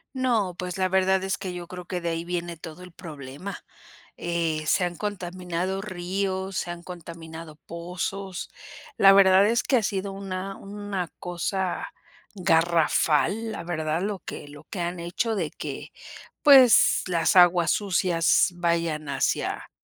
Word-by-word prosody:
No, 230 -8 +1
pues 180 0 -4
la 185 -1 +1
verdad 190 0 +2
es 190 +1 -1
que 185 -2 -5
yo 175 -1 -7
creo 180 0 -8
que 180 0 -4
de 170 - -2
ahí 165 0 -3
viene 175 -1 -3
todo 165 +2 -10
el 180 - -12
problema, 155 +1 -8 0.6
eh, 165 -2 -1
se 180 - +3
han 175 -1 -2
contaminado 185 -2 -3
ríos, 190 0 -3
se - - -2
han 175 0 -6
contaminado 165 -2 -9
pozos. 180 +2 -5 0.5
La 195 0 +8
verdad 195 0 +6
es 235 +2 +2
que 265 - +3
ha 225 - 0
sido 195 0 -2
una 195 0 -5
una 200 -2 -5
cosa 185 - -2 0.5
garrafal, 170 +3 +2
la 170 - -6
verdad, 160 -1 -2
lo 200 0 -2
que 145 - -8
lo 145 +1 -13
que 180 - -5
han 175 +1 -3
hecho, 180 +7 -1
de 170 -7 -1
que - - -7 0.5
pues 265 -5 +7
las 170 0 +2
aguas 175 -2 +6
sucias 180 -4 +2
vayan 170 -3 -1
hacia 140 - -1
180 Hz, 150 wpm, -25 LUFS, 170-195 Hz, 0.6 s, La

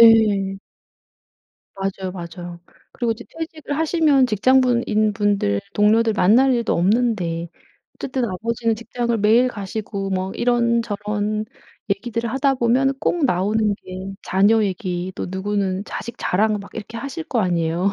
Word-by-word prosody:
예. 210 -4 +5 1.2
맞아요 195 -1 -3
맞아요. 175 -1 -8 0.3
그리고 235 -2 -1
이제 235 +2 -10
퇴직을 315 -3 -5
하시면 310 -5 +3
직장분 250 +2 +3
인 215 0 +2
분들, 200 - +1
동료들 220 +2 +4
만날 235 +8 +4
일도 235 -2 +1
없는데 180 -4 +1 0.5
어쨌든 260 -2 -2
아버지는 230 +4 -1
직장을 235 +1 -2
매일 225 +5 +4
가시고 200 -2 -5
뭐 190 0 -2
이런저런 215 -3 0 0.4
얘기들을 230 +3 -2
하다 270 0 +2
보면은 255 +3 +2
꼭 340 -4 +1
나오는 210 +1 +1
게 185 +1 -7
자녀 205 +4 +3
얘기 185 -1 -2
또 - - -4
누구는 195 0 -1
자식 235 +2 -6
자랑 210 +3 +1
막 200 - -11
이렇게 225 +1 -7
하실 280 +6 -5
거 240 -8 0
아니에요. 175 +1 0
215 Hz, 305 characters per minute, -21 LUFS, 195-235 Hz, 1.2 s, 예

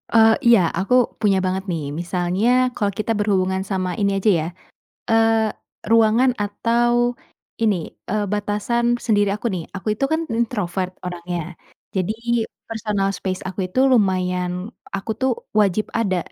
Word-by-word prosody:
Eee, 225 0 +7 0.2
iya, 235 -4 +7 0.2
aku 200 +6 0 0.3
punya 200 -3 +3
banget 190 +1 -1
nih, 160 -3 -2 0.2
misalnya 180 +5 0 0.3
kalau 205 -2 0
kita 215 +2 -1
berhubungan 190 -2 +1
sama 185 -1 0
ini 200 0 +2
aja 205 +2 +2
ya, 155 - -3 0.6
eee, 225 -1 +3 0.3
ruangan 230 +3 +5
atau 240 +3 +1 0.5
ini, 210 -3 +3 0.4
eee, 210 -1 +1
batasan 235 +4 0
sendiri 205 -3 +3
aku 210 +4 -2
nih, 170 - -4
aku 195 - -7
itu 245 - -4
kan 320 - +2 0.2
introvert 190 -6 -1
orangnya 175 -1 -5 0.4
jadi 190 +2 0 0.5
personal 210 -3 -1
space 185 -1 -3
aku 190 +1 -6
itu 255 - 0
lumayan 185 -5 +2 0.4
aku 195 +3 -4
tuh 260 0 +3 0.3
wajib 205 +1 +2
ada 195 -5 +1
205 Hz, 140 wpm, -21 LUFS, 185-225 Hz, 0.6 s, Eee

